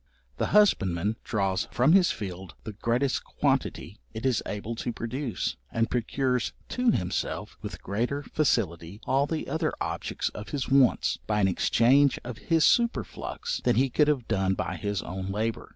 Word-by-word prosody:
The - - 0
husbandman 105 - +3
draws 95 -3 0
from 130 +7 +3
his 185 -2 +6
field 95 -3 -6
the 110 - -6
greatest 120 +5 0
quantity 100 - -1 0.2
it 110 - -5
is 130 -4 +2
able 105 +3 -4
to 120 - -2
produce, 120 +2 -3
and 115 0 0
procures 125 0 0 0.2
to 250 -1 +1
himself, 90 - -1
with - - -7
greater 120 +9 -2
facility, 100 - -1
all 135 +2 +2
the 160 0 -3
other 160 -1 0
objects - - -2
of 105 0 -9
his 135 +4 -2
wants, 135 -3 +3
by 105 -1 +1
an 100 - +4
exchange 130 +8 +4
of 120 -3 -7
his 165 -2 +2
superflux, 240 - 0
than 120 - +2
he 130 +2 +2
could 150 +4 +3
have 140 -6 +1
done 95 0 +1
by - - -3
his 100 -2 -2
own 95 +1 -5
labour. 110 +2 -2
115 Hz, 165 wpm, -27 LUFS, 100-140 Hz, 0.2 s, his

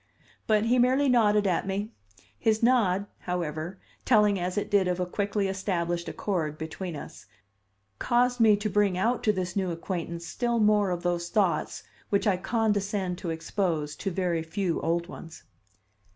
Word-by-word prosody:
But 215 0 +3
he 245 +2 +3
merely 260 +3 +3
nodded 210 -4 +4
at 185 0 0
me. 200 +3 -2 0.5
His 220 0 +1
nod, 205 -6 +3
however, 175 0 -4 0.3
telling 210 -4 +4
as 180 +2 -3
it 205 - -2
did 200 -2 +3
of 180 0 -1
a 180 - 0
quickly 200 +2 -1
established 175 -3 -2
accord 160 -7 -2
between 160 +2 -5
us, 95 - -10 0.7
caused 245 +1 +2
me 220 -2 +6
to 210 +1 -2
bring 205 -3 +2
out 230 +6 +1
to 215 - +5
this 185 -3 -3
new 190 -2 0
acquaintance 170 0 -4
still 235 +6 -1
more 210 -2 +3
of 175 -1 -3
those 175 -1 -1
thoughts 195 -5 0 0.3
which 200 +2 +1
I 200 -4 +3
condescend 200 -3 -1
to 175 - -4
expose 160 -2 -2
to 195 - -2
very 175 -2 -1
few 170 +2 -2
old 170 +1 0
ones. 165 -2 -11
190 Hz, 165 wpm, -27 LUFS, 175-210 Hz, 0.7 s, me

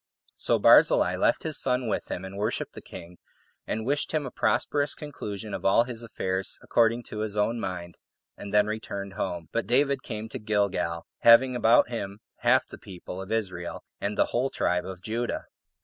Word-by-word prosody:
So - - +2
Barzillai - - +6
left - - +2
his 155 -2 -3
son 125 -2 0
with 105 - -2
him, 90 - -4
and 95 +1 -8
worshipped 105 +2 -2
the - - -9
king, 90 -1 -11 0.5
and 110 0 -2
wished 145 +5 0
him 155 -2 0
a 130 - -5
prosperous 145 0 +1
conclusion 105 -8 -6
of - - -4
all 100 +4 +5
his 120 -2 -6
affairs 95 -4 -3
according 115 +1 +2
to 105 - -5
his 105 -1 -3
own 115 +3 +1
mind, 90 -4 -5 0.4
and 100 - -8
then 105 0 +4
returned 100 -2 -5
home; 85 -5 -4
but 115 - -1
David 140 +2 +2
came 110 -2 -5
to 130 - -6
Gilgal, 100 -6 -1
having 125 +2 +6
about 120 0 +4
him 100 -4 -5 0.2
half - - +3
the - - -11
people 90 0 -8
[of 95 - -8
Israel], 95 -6 -3 0.2
and 100 +1 -3
the - - +4
[whole] 130 +3 +1
tribe 90 -5 0
of 95 -1 -8
Judah. 115 +2 -2
110 Hz, 185 wpm, -27 LUFS, 95-120 Hz, 0.5 s, Barzillai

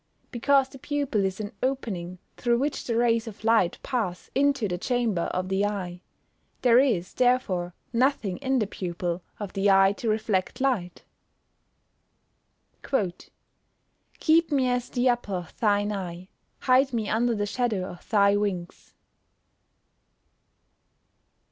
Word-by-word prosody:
_ - - -42
Because 270 +2 +3
the 270 - -13
pupil 280 -8 -1
is 190 +1 -3
an 205 -1 -4
opening 200 -10 -2 0.2
through 240 -1 +1
which 280 +3 -2
the 230 - -1
rays 230 -1 +2
of 215 -1 -9
light 225 -6 +3
pass 220 -10 -3
into 275 -4 +2
the 180 -2 -3
chamber 235 -7 0
of 185 0 -2
the 190 +1 0
eye. 185 -4 -3 0.6
There 245 -1 +6
is, 220 -10 +1
therefore, 215 -9 +1 0.2
nothing 230 -6 +1
in 265 -1 0
the 220 - +2
pupil, 175 -2 -4 0.2
of 205 -3 -6
the 200 0 +2
eye 195 0 +5
to 230 - -2
reflect 215 -3 -1
light. 240 -10 -1 1.8
[Verse: 190 -10 -2 0.9
"Keep 325 0 +3
me 265 -3 +2
as 245 0 -1
the 245 0 +1
apple 240 -5 0
of 175 -2 -6
thine 205 -1 +2
eye; 185 -2 -6 0.3
hide 260 +1 +3
me 220 -3 -1
under 235 +2 +1
the 205 -1 -1
shadow 210 -3 -1
of 175 - -12
thy 200 -2 +4
wings." 190 -4 -3
215 Hz, 140 wpm, -26 LUFS, 190-250 Hz, 1.8 s, There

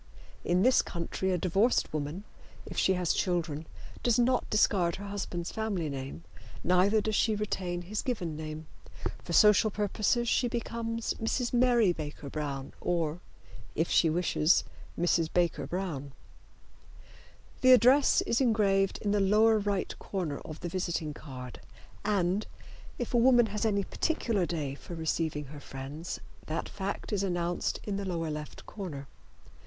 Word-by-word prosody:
In 180 +2 +2
this 255 +2 +5
country 175 +2 -3
a 180 - +2
divorced 195 +7 +2
woman, 155 +5 -3 0.4
if - - -8
she 190 - +3
has 180 -2 +1
children, 165 -4 -1 0.3
does 240 -2 +3
not 245 +1 +2
discard 185 -5 +3
her 200 - -7
husband's 185 -4 -4
family 200 -8 -2
name, 135 +3 -6 0.4
neither 190 +4 +4
does 215 +1 -2
she 220 +1 +2
retain 185 -4 -2
his 210 +4 -3
given 180 - -3
name. 155 0 -6 0.6
For - - -7
social 210 +4 +6
purposes 215 +3 0
she 245 +2 +2
becomes 230 -1 -2
Mrs. 240 +2 -1
Mary 240 -6 +4
Baker 150 -3 -7
Brown 140 -3 -4
or, 165 -2 0 0.6
if 160 +2 0
she 165 - +5
wishes, 165 0 +3 0.4
Mrs. 170 -2 +2
Baker 175 -2 +1
Brown. 160 -7 -4 1.5
The 255 - +7
address 255 +3 +6
is 235 - 0
engraved 200 -5 +2
in 205 - +1
the 205 - +2
lower 215 +3 +4
right 200 -2 -1
corner 170 -8 -3
of 155 - -9
the - - -3
visiting 170 -4 -2
card, 130 -5 -9 0.4
and, 200 -1 +1 0.5
if 245 - -4
a - - +4
woman 240 0 +6
has 215 +2 0
any 200 -2 +1
particular 225 - 0
day 150 -5 -2
for 170 +4 -9
receiving 160 -2 -1
her 150 - -8
friends, 140 +5 -6 0.3
that 160 +2 -2
fact 200 +2 -4
is 200 - +1
announced 175 -2 -1
in 200 -2 -3
the 200 - -3
lower 165 -4 -2
left 150 0 -7
corner. 155 -10 -7
185 Hz, 150 wpm, -30 LUFS, 160-215 Hz, 1.5 s, The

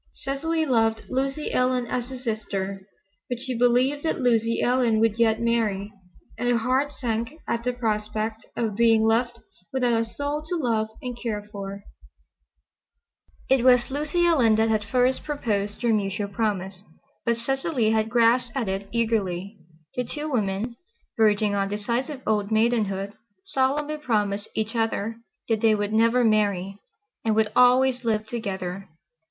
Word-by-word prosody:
Cecily 315 +4 -1
loved 225 -4 +2
Lucy 270 +3 -2
Ellen 250 -1 +2
as 245 0 -3
a 260 - -6
sister. 200 -5 -4 0.4
But 245 - -2
she 255 0 -2
believed 250 +4 +2
that 320 - -1
Lucy 230 -2 +2
Ellen 245 -3 +2
would 225 0 +2
yet 220 -1 +3
marry, 220 -4 0 0.5
and 245 0 0
her 240 - +3
heart 260 +5 +1
sank 235 0 -3
at 235 - -1
the 250 - +1
prospect 220 -2 -2
of 220 -4 -1
being 225 0 +4
left 235 +2 +1 0.3
without 245 -3 +2
a - - +1
soul 285 +6 -3
to 355 - 0
love 230 -8 0 0.2
and 250 -1 -4
care 210 -3 -3
for. 200 0 -7 1.6
It 265 -2 +3
was 250 0 +4
Lucy 305 +5 0
Ellen 255 -10 +4
that 220 +1 +2
had 215 -1 +1
first 250 +4 +1
proposed 210 -8 -2
their 235 -2 +3
mutual 200 -1 -1
promise, 195 -3 -2 0.4
but 235 0 +1
Cecily 265 -1 0
had 220 0 +1
grasped 240 +2 +3
at 235 -5 -1
it 195 +1 -3
eagerly. 210 -4 -1 0.4
The 250 - 0
two 295 +5 -4
women, 220 0 -1 0.4
verging 210 -1 +3
on 195 -1 0
decisive 240 +7 -2
old 210 -1 0
maidenhood, 215 -3 +1 0.3
solemnly 290 +3 0
promised 210 -7 -1
each 220 +2 -2
other 225 -1 -1 0.3
that 225 -2 0
they 220 -1 +4
would 205 0 -2
never 230 +3 +4
marry, 200 -3 +1 0.4
and 220 -2 +1
would 220 -1 +2
always 250 0 +4
live 215 -2 0
together. 195 -4 -5
230 Hz, 150 wpm, -25 LUFS, 210-250 Hz, 1.6 s, being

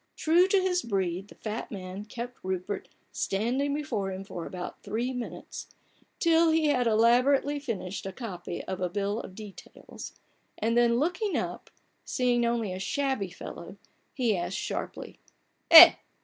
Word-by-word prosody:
True 340 +4 +4
to 390 0 +3
his 365 -1 +1
breed, 190 - -2
the - - -15
fat 220 +1 -5
man 190 0 -7
kept 240 +3 -7
Rupert 185 +1 -4 0.2
standing 245 +8 -1
before 230 -10 -3
him 190 +1 -6
for 180 -4 -7
about 180 -1 -7
three 240 +4 -3
minutes, 245 -2 -7 0.5
till 335 -1 +4
he 315 -1 +2
had 250 -4 +2
elaborately 250 +6 +3
finished 195 -8 -5
a - - -4
copy 185 -5 -6
of 190 -1 -5
a 180 - 0
bill 205 +3 -2
of 190 - -9
details; 210 -2 -11 0.4
and 230 +2 0
then 235 -1 +4
looking 360 - 0
up, - - -4
and - - -23
seeing 245 -2 +1
only 230 -5 -1
a 185 - -5
shabby 265 -1 -1
fellow, 180 - -9 0.4
he 235 -5 +1
asked 175 +1 -3
sharply: - - -5 0.3
— - - -46
"Eh? 335 +1 +12
230 Hz, 160 wpm, -28 LUFS, 195-280 Hz, 0.5 s, Eh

